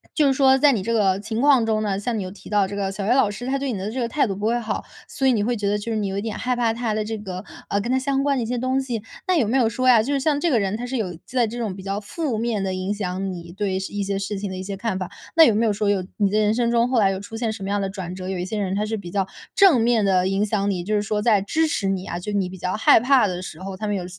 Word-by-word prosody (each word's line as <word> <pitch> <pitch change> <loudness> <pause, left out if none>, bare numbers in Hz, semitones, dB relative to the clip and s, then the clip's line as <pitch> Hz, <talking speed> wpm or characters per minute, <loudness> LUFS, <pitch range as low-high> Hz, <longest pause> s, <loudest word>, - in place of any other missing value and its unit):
就 305 - +3
是 270 - +3
说 265 0 +5
在 290 +1 +5
你 220 - 0
这 230 - -1
个 195 -4 +2
情 220 +3 -3
况 275 -5 +5
中 215 -1 0
呢， 200 -2 -1
像 230 +2 -2
你 205 - -2
又 185 - -6
提 200 - -13
到 205 -2 +2
这 200 - -6
个 195 -1 -1
小 195 0 -4
学 230 - +3
老 255 -5 +4
师， 205 +4 -6
他 275 +1 0
对 270 -2 -2
你 210 - -3
的 195 +3 -4
这 260 - -4
个 235 - 0
态 280 +5 +1
度 195 - -3
不 205 +2 -2
会 235 +1 +2
好， 225 -2 -3 0.2
所 270 - -1
以 260 - +5
你 210 -3 +1
会 240 +3 0
觉 205 -1 -2
得 205 - +1
就 210 +3 -5
是 220 - 0
你 210 -2 -1
有 195 0 -3
一 200 - -1
点 220 -1 -4
害 250 0 -1
怕 235 -2 +1
他 230 -1 -2
的 215 0 -1
这 220 +1 -3
个， 185 -2 -6 0.3
呃， 200 - +1
跟 235 - -3
他 260 - +3
相 275 +1 0
关 280 -1 +1
的 - - 0
一 - - -3
些 245 +1 -2
东 260 +2 0
西， 235 -5 -4 0.2
那 370 - +3
有 245 -9 +2
没 245 +5 +2
有 235 -4 +3
说 255 +3 -1
呀， 240 -3 +7
就 280 - -1
是 280 - +1
像 285 +1 +1
这 340 - +1
个 250 -7 +3
人， 195 0 -1
他 245 - -5
是 260 +1 -2
有 185 -6 -3
在 250 -2 +1
这 235 +3 -6
种 215 -5 -3
比 190 - -9
较 195 +1 -2
负 255 +4 -3
面 225 -3 -1
地 190 -1 -1
影 185 +2 -2
响 190 -1 -3
你 170 -1 -8
对 195 -1 -2
一 195 +2 -3
些 195 0 -2
事 195 +1 -3
情 200 0 -4
的 185 - -5
一 185 - -5
些 195 +1 -5
看 210 -2 -2
法？ 185 - -4 0.3
那 330 - +9
有 230 - +4
没 225 +2 +2
有 215 - +2
说， 205 0 0
有 200 -2 +1
你 205 -2 +2
的 210 - +2
人 210 0 +3
生 235 -1 +1
中 235 +1 +2
后 255 - +1
来 195 -2 +4
有 190 - -3
出 205 +3 -9
现 225 -1 -1
什 215 - -9
么 195 - -3
样 205 0 0
的 195 - -2
转 185 -2 -6
折？ 185 0 -6
有 190 -1 -3
一 180 - -2
些 215 +4 -4
人 190 -2 -1
他 210 +1 0
是 220 +1 -2
比 175 -4 -8
较 195 -1 0 0.3
正 365 - +6
面 230 -1 +3
地 185 -2 +3
影 195 +2 +1
响 205 -1 0
你， 180 -3 -3
就 210 +4 -1
是 205 - +2
说 210 0 -1
在 210 -2 +3
支 315 +11 +1
持 205 -9 -1
你 190 -1 -2
啊？ - - -3
就 210 +4 -5
是 205 - 0
你 190 -2 0
比 190 - -9
较 180 +1 -2
害 220 - +6
怕 255 -1 +4
的 180 -1 -4
时 160 -3 -8
候， 190 0 -6
他 215 - -4
们 205 - 0
有 185 -2 -3
210 Hz, 380 characters per minute, -23 LUFS, 195-240 Hz, 0.3 s, 那